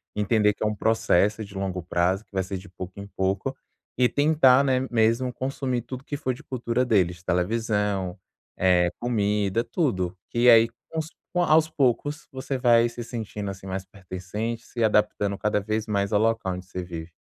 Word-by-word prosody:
Entender 105 0 +3
que - - -6
é - - +1
um 105 - 0
processo 110 -1 +2
de 100 - -14
longo 95 -2 -3
prazo, 90 +4 0
que 100 - -47
vai 95 - +1
ser 95 +1 -4
de 95 +2 -11
pouco 95 0 -8
em 100 - -6
pouco. 100 +6 -2 0.4
E 125 - +5
tentar, 145 -3 +5
né, 130 -2 +2
mesmo 115 +2 +2
consumir 130 -1 -2
tudo 130 +3 -8
que 145 - -5
for 130 -3 -1
de - - -11
cultura 125 -1 -1
deles, 90 -7 +1
televisão, 100 0 0 0.4
eh, 90 -1 +4
comida, 105 -2 0
tudo. 95 - -1 0.2
E 120 +1 +5
aí, 115 0 +8 0.3
aos 160 0 -2 0.3
aos 160 -3 +4
poucos, 145 +1 0
você 135 +1 -3
vai 120 -2 +4
se 120 0 -7
sentindo, 110 -4 -5
assim, 95 0 -10
mais 95 0 -4
pertencente, 100 +5 -5
se 120 -2 -3
adaptando 105 -2 +2
cada 105 -1 +1
vez 110 +1 -2
mais 100 -1 -1
ao 105 - +3
local 110 -3 +1
onde 90 0 -8
você 90 -1 -5
vive. 85 -1 -7
110 Hz, 180 wpm, -25 LUFS, 95-125 Hz, 0.4 s, aí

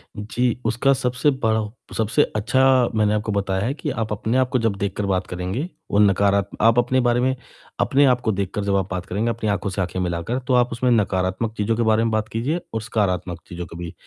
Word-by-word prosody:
जी, 120 +3 -1
उसका 120 +5 +2
सबसे 125 +2 +1
बड़ा 115 -5 0
हो 105 -1 -5 0.2
सबसे 110 +7 +2
अच्छा 125 +5 +1 0.3
मैंने 105 -1 +2
आपको 105 0 -1
बताया 100 -1 -1
है 130 - 0
कि 150 0 -5
आप 115 -4 -3
अपने 110 +4 -1
आप 130 -1 +2
को 130 - +2
जब 115 -3 0
देखकर 100 +1 -2
बात 95 -1 -1
करेंगे, 95 - -3 0.2
वो 100 - +3
नकारा 100 0 +4 0.2
आप 115 +2 +5
अपने 125 +2 +2
बारे 120 0 +2
में 130 +1 +1 0.4
अपने 140 +1 +4
आपको 125 -4 +2
देखकर 100 0 -2
जब 100 -1 0
आप 95 -1 0
बात 90 -1 -3
करेंगे, 105 +5 -1
अपनी 115 -2 -2
आँखों 100 0 -1
से 95 +1 -2
आँखें 95 0 -3
मिलाकर, 90 +7 -2
तो 130 0 -2
आप 125 0 +3
उसमें 120 +2 0
नकारात्मक 100 0 0
चीज़ों 105 +2 0
के 115 - 0
बारे 110 0 +3
में 115 - 0
बात 110 0 0
कीजिए 130 +11 -1
और 110 - -2
सकारात्मक 95 -6 -1
चीज़ों 90 0 -6
के 85 - -11
भी 85 -1 -6
110 Hz, 225 wpm, -22 LUFS, 100-120 Hz, 0.4 s, आप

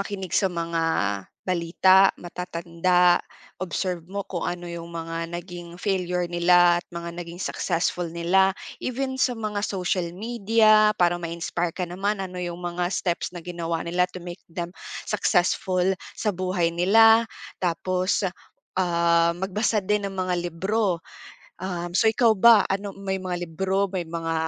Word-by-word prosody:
makinig 195 -2 -5
sa 195 - +3
mga 170 -1 -2 0.7
balita, 185 +2 +5
matatanda. 175 0 +1 0.4
Observe 180 0 -2
mo 200 +1 -3
kung 175 -3 -4
ano 175 0 -5
'yong 170 0 -7
mga 165 -1 -5 0.2
naging 175 0 -7
failure 180 -2 -1
nila 175 0 +4
at - - -24
mga 170 0 -5
naging 170 0 -8
successful 175 -1 -1
nila. 180 +3 +2 0.3
Even 260 +1 -2
sa 250 - +3
mga 215 -2 -3
social 180 -2 -1
media, 215 0 +4
para 175 -1 +3
ma-inspire 170 0 -3
ka 180 +1 -3
naman, 195 +3 -2
ano 180 -1 -8
'yong 175 -1 -4
mga 175 0 -2
steps 175 -1 -1
na - - -5
ginawa 170 -2 -3
nila 175 +2 +2
to 180 - -7
make 175 +1 -8
them 170 +1 -5 0.4
successful 180 +1 +1 0.3
sa 210 - 0
buhay 185 -2 0
nila. 225 +6 +6 0.4
Tapos, 185 +2 0 0.5
ah, 170 -2 +3
magbasa 205 +4 0
din 210 +1 +1
ng 195 - -9
mga 185 -1 0 0.2
libro. 190 0 0 0.6
Um, 175 -2 -4
so 225 - +5
ikaw 225 0 +4
ba, 225 0 +8
ano 195 +1 -2
may 195 -1 -2
mga 175 -1 -3
libro, 190 +4 0
may 175 -2 -2
mga 165 -1 -3
180 Hz, 145 wpm, -25 LUFS, 170-195 Hz, 0.7 s, ba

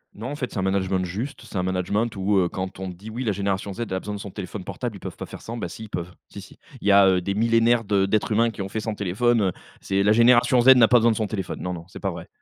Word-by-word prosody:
Non 115 +5 -6
en - - -4
fait, 125 -4 -4
c'est - - -4
un - - +1
management 95 -1 0
juste, 110 +11 -5
c'est - - -7
un 90 - 0
management 95 +5 -1
où, 100 +1 +1
heu, 90 -2 +3
quand 95 0 -5
on 95 - -4
dit: 90 +5 -10
«Oui 120 +4 -4
la 110 - +1
génération 100 0 -2
Z 105 - -7
a 95 - -1
besoin 105 +2 -6
de 100 - -5
son 100 - -7
téléphone 95 0 -7
portable, 120 +4 -5
ils - - -10
peuvent - - -8
pas - - -6
faire - - -10
sans». 115 +1 -6
Ben 105 - -3
si, 110 - -9
ils 105 - -14
peuvent, 85 -1 -5 0.2
si, - - -9
si. - - -15 0.2
Il - - -4
y - - +6
a, 100 -1 +7
heu, 95 -1 +3
des 100 +3 -2
millénaires 115 +2 +3
de 100 -2 +2
d'êtres 105 +3 0
humains 115 +2 +3
qui 110 - -7
ont 95 - -4
fait 110 - -3
sans 110 0 -3
téléphone, 105 +4 +1
heu, 95 -2 +2 0.3
c'est 100 0 0
la 105 - +4
génération 120 +2 +5
Z 130 +2 +8
n'a 120 -3 +6
pas 125 - +5
besoin 115 0 +4
de - - 0
son 110 - 0
téléphone, 95 -3 -5
non, 90 - -3
non, 85 -1 -8
c'est - - -11
pas - - -2
vrai - - -9
100 Hz, 320 wpm, -24 LUFS, 95-115 Hz, 0.3 s, Z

